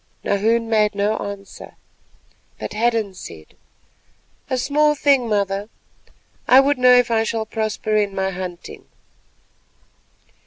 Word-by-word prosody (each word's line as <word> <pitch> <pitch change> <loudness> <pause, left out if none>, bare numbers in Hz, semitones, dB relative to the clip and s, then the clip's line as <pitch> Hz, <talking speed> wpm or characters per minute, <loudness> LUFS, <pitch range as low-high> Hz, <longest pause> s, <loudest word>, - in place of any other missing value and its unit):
Nahoon 225 +3 +1
made 215 -2 +1
no 205 +2 0
answer, 200 -1 -8 0.8
but - - -6
Hadden 225 -2 0
said:— 80 - -12 0.9
"A 260 - -1
small 300 +3 +2
thing, 275 -5 +2
mother. 200 0 -1 0.8
I 255 - +7
would 275 0 +2
know 250 0 +6
if 245 -1 +3
I 225 -1 +2
shall 225 0 -2
prosper 215 -1 -3
in 205 -2 0
my 190 0 -1
hunting." 180 -1 -8
215 Hz, 120 wpm, -20 LUFS, 200-240 Hz, 0.9 s, I